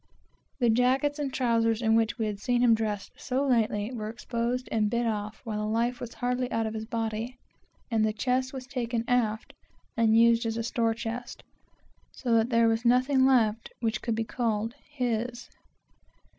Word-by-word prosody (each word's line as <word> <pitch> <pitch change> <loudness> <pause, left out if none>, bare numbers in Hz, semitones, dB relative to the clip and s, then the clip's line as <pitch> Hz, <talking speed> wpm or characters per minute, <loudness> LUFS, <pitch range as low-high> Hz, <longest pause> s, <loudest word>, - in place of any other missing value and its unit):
The 240 -3 +4
jackets 265 +5 +2
and 280 -2 -2
trowsers 230 -4 +1
in 225 -2 +2
which 225 +2 +2
we 225 - -1
had 210 -2 -3
seen 245 +3 +1
him 235 -2 +6
dressed 215 -2 -2
but - - -19
a - - -11
few 270 +2 0
days 225 -3 +3 0.2
before, 250 +4 -6
were 215 0 -4
exposed 235 +2 -3
and 215 -2 +1
bid 235 +2 0
off 215 -1 -3
while 215 -2 -3
the 210 0 -2
life 235 +2 0
was 240 -1 -7
hardly 250 0 -1
out 225 0 0
of 220 - -3
his 220 0 -4
body, 225 +2 -3 0.5
and 220 -1 +2
his 215 0 0
chest 255 +3 0
was 260 -2 -7
taken 240 -3 -2
aft 225 -3 0 0.4
and 225 -1 +4
used 230 0 +4
as 225 0 -2
a 230 - -1
store 230 -1 0
chest, 235 +2 -6 0.7
so 245 -3 -1
that 225 +1 +3
there 230 -1 +4
was 225 +1 +1
nothing 255 +2 +4
left 225 -4 +2
which 225 -2 -1
could 230 -2 -1
be 225 - 0
called 225 -1 -2 0.2
his. 245 -3 -3
230 Hz, 195 wpm, -28 LUFS, 220-250 Hz, 0.7 s, him